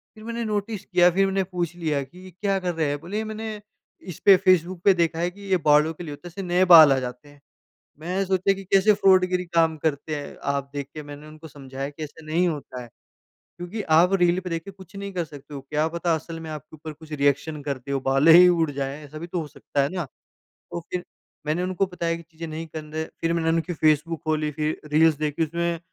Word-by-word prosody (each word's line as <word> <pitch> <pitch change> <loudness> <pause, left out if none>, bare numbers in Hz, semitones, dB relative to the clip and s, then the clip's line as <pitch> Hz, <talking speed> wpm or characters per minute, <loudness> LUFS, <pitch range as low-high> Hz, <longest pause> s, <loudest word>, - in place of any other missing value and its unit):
फिर 215 - -13
मैंने 235 +1 -4
नोटिस 210 -1 -3
किया, 180 -1 +4
फिर 195 +3 +2
मैंने 195 0 0
पूछ 175 -2 -4
लिया 155 -5 -1
कि 175 +7 -16
ये 185 - -11
क्या 195 +2 -1
कर 180 -1 -2
रहे 160 -2 0
हैं? 145 - -2
बोले 210 +5 -3
मैंने 220 0 -5 0.6
इस - - -14
पे 195 -2 +9
फेसबुक 185 -2 +2
पे 195 - +7
देखा 170 -2 0
है 175 +1 +1
कि 205 - -16
ये 185 - +5
बालों 150 +2 +4
के 175 - -9
लिए 155 - -7
होता 160 +5 -11
है, - - -7
इससे 185 +4 -7
नए 180 +1 +2
बाल 155 -4 +9
आ 135 - +1
जाते 125 +3 -7
हैं। 145 0 -19 0.6
मैं 180 +5 -2
सोचा 190 +1 +2
कि 195 - -9
कैसे 195 +3 +4
फ्रॉडगिरी 185 -2 +3
काम 165 -1 +2
करते 155 0 -1
हैं, 145 - -7
आप 140 0 -2
देख 140 -1 -4
के 155 - -6
मैंने 145 +1 -10
उनको 155 +1 -12
समझाया 135 -1 -7
कि 145 +2 -8
ऐसा 155 +1 -10
नहीं 165 +4 +1
होता 145 -6 -5
है। 120 - -11 0.7
क्योंकि 175 +5 -5
आप 180 +4 +5
रील 175 0 +3
पे 180 - -7
देख 165 -1 -2
के 195 - -8
कुछ 190 0 -16
नहीं 200 0 -6
कर 175 -2 -2
सकते 145 -1 -12
हो, 140 - -5
क्या 150 +3 -1
पता 170 0 0
असल 165 +1 -6
में 160 - -7
आपके 155 +1 -9
ऊपर 155 +1 -8
कुछ 155 +1 -14
रिएक्शन 145 +1 0
करती 140 -2 -5
हो, 135 - 0
बालें 135 +4 +5
ही 180 +1 +9
उड़ 165 -3 +2
जाएँ, 140 +2 -5
ऐसा 155 +2 -9
भी 170 - -6
तो 175 0 -3
हो 155 - -5
सकता 140 - -2
है 140 - +1
ना, 175 -3 -2 0.5
तो 170 - -9
फिर 180 -1 -2 0.4
मैंने 155 +4 0
उनको 185 +1 0
बताया 170 -2 -2
कि 170 - -10
चीज़ें 165 0 -9
नहीं 160 +1 -6
कन 155 -1 -7
रे 160 0 -1 0.2
फिर 165 0 +1
मैंने 165 -1 0
उनकी 165 +2 0
फेसबुक 155 +1 +1
खोली, 155 -1 0
फिर 155 +1 -2
रील्स 160 +1 +5
देखी, 155 +1 0
उसमें 170 +2 -2
165 Hz, 245 wpm, -24 LUFS, 150-180 Hz, 0.7 s, पे